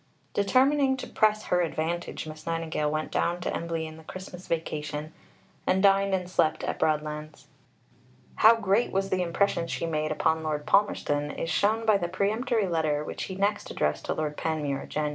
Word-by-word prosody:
" - - -38
Determining 265 +6 +3
to - - -5
press 215 -2 +2
her 180 - +1
advantage, 165 0 -2
Miss 155 0 -10
Nightingale 165 -2 -1
went 155 +1 -2
down 175 +1 0
to - - -2
Embley 165 -1 -2
in 155 0 -9
the 160 - -13
Christmas 185 +1 -9
vacation, 155 -1 -3 0.5
and 190 +1 +2
dined 195 0 +4
and 180 -1 -3
slept 160 -3 +1
at - - -3
Broadlands. 150 0 -2 0.9
How 225 +2 +8
great 210 +1 +1
was 195 0 -1
the 185 -1 +1
impression 170 0 +1
she 170 - -2
made 155 -1 -1
upon 160 +1 +1
Lord 150 -2 -2
Palmerston 145 -7 +2
is 165 - -3
shown 220 +2 +2
by 215 -2 +5
the 175 - -1
peremptory 220 +4 0
letter 155 -3 0
which - - -5
he 190 - -6
next 205 +2 0
addressed - - -1
to - - -1
Lord 150 -1 -2
Panmure 150 -4 -2
(Jan. 150 0 -1
170 Hz, 180 wpm, -27 LUFS, 155-200 Hz, 0.9 s, How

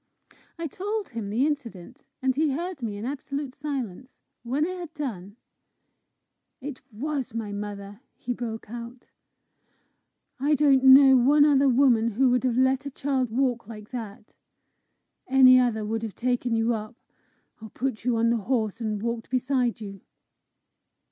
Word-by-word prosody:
I 335 - -4
told 405 +6 -4
him 225 -4 -5
the 235 +7 +1
incident, 250 - -5 0.2
and 260 -1 +1
he 300 -1 +1
heard 345 0 -4
me 215 -3 -4
in 210 - -6
absolute 275 0 -5
silence. 265 -5 -6 0.2
When 265 +6 -1
I 365 - -3
had 355 -3 -7
done, 215 -9 -6 1.2
"It 280 -1 -7
was 260 +1 -4
my 220 -3 -4
mother!" 205 +1 -7
he 245 - -4
broke 230 -2 -6
out; 240 +1 -9 1.3
"I 295 +3 +2
don't 275 -2 +4
know 265 0 +8
one 285 +4 +5
other 280 -2 +4
woman 245 -3 +4
who 255 +3 +3
would 250 0 +1
have 245 -2 0
let 260 +2 +2
a - - -3
child 265 -2 -1
walk 245 -1 -1
like 215 -2 -10
that! 215 -4 -8 0.9
Any 255 -1 +7
other 225 -4 0
would 225 +1 -2
have 225 -3 -6
taken 245 -1 -1
you 225 +1 +1
up, 215 +1 -6 0.7
or 220 - -9
put 250 0 -4
you 240 -1 +1
on 230 +1 +2
the 235 - +2
horse 225 0 -2
and 215 -2 -3
walked 235 -1 -3
beside 255 -2 0
you!" 195 -2 -8
250 Hz, 155 wpm, -26 LUFS, 225-275 Hz, 1.3 s, know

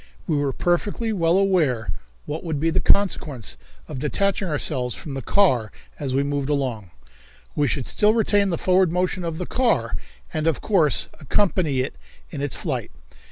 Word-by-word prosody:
We 155 - 0
were 145 -1 +1
perfectly 205 - 0
well 170 -2 +2
aware 160 - +2 0.3
what 155 +2 -5
would 160 -4 -2
be 165 +2 +1
the - - +1
consequence 140 - +1 0.3
of 145 -4 -6
detaching 195 +7 0
ourselves 135 -5 0
from 145 - -7
the 135 - -4
car 130 - +2 0.3
as 135 -3 -2
we 140 - +2
moved 140 -1 -2
along. 125 -9 -2 0.7
We 145 -1 +2
should 135 -3 -2
still 210 +1 +3
retain 205 -3 +2
the 170 - -1
forward 185 -1 +3
motion 180 +1 -1
of 165 -2 -3
the 180 - -3
car, 250 +4 +1 0.4
and 155 -1 -1
of 160 - +1
course 170 -9 +3
accompany 155 -3 +1
it 130 - -5 0.3
in 145 - -5
its 145 -2 0
flight. - - -3
155 Hz, 170 wpm, -23 LUFS, 140-185 Hz, 0.7 s, still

